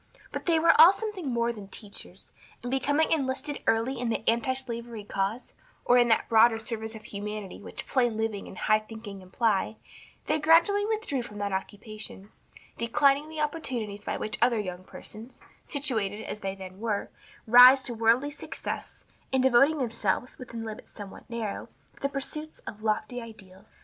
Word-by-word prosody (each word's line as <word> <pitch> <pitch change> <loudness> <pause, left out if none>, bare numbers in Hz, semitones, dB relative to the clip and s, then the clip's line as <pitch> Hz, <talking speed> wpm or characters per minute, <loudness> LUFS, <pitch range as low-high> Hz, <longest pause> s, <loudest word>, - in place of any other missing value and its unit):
But - - -6
they 335 -1 +4
were 330 +1 +6
all 335 +3 +11
something 395 -9 -4
more 235 -1 0
than 205 -3 -10
teachers, 200 +1 -4 0.3
and 245 - -4
becoming 285 +4 +1
enlisted 280 -1 -1
early 230 +3 +1
in 245 -1 -1
the 225 0 -2
antislavery 235 -2 -1
cause, 200 +4 -3 0.3
or 245 0 +6
in 240 - +5
that 225 - +2
broader 225 0 +5
service 220 0 -4
of 215 - -10
humanity 210 -1 -6
which - - -8
"plain 240 -4 +1
living 220 -2 -2
and 185 - -10
high 215 0 +3
thinking" 215 -2 -9
imply, 210 +2 0 0.5
they 310 +1 +1
gradually 340 +7 +4
withdrew 435 - -1
from 210 -3 -9
that 200 -1 -2
occupation, 205 +1 -6 0.5
declining 280 +5 +3
the 315 -1 -4
opportunities 245 -10 -3
by - - -2
which 215 - -4
other 240 -1 +4
young 185 -3 -5
persons, 225 +5 -10 0.2
situated 220 -8 -1
as 210 - -6
they 195 -1 -4
then 190 0 -10
were, 215 -2 -2 0.3
rise 250 +3 +9
to 245 - -4
worldly 230 +5 +2
success, 295 - -6 0.3
and 265 -1 +2
devoting 265 +4 +5
themselves, 235 -2 -1
within 235 -3 -7
limits 220 -1 -8
somewhat 205 +2 -11
narrow, 230 -3 -4 0.3
to - - -21
the 275 - 0
pursuit 305 +3 -5
of 210 - -8
lofty 220 +3 -1
ideals. 205 -3 -13
230 Hz, 165 wpm, -28 LUFS, 215-265 Hz, 0.5 s, all